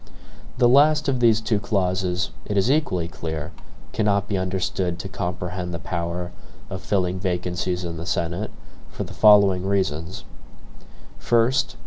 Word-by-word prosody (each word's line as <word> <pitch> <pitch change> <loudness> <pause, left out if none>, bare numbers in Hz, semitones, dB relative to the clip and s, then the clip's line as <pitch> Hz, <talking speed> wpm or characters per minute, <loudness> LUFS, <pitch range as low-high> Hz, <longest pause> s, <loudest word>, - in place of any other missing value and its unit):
The 125 -1 +5
last 150 +4 +5
of 130 -2 +1
these 115 -3 +4
two 110 -1 0
clauses, 95 - -1
it 105 - -2
is 100 +7 +3
equally 95 - +1
clear, 80 -3 -5 0.4
cannot 100 -2 +1
be 100 - -1
understood 95 -1 -1
to 95 - -6
comprehend 90 -1 -4
the - - -2
power 85 +1 -4 0.4
of - - -5
filling 95 -2 0
vacancies 90 0 -2
in 85 -1 -5
the 85 - -6
Senate, 85 0 -2 0.4
for - - -5
the - - -9
following 100 -4 +5
reasons: 95 -4 -1 1.0
First. 120 +3 +2
95 Hz, 140 wpm, -23 LUFS, 90-105 Hz, 1.0 s, The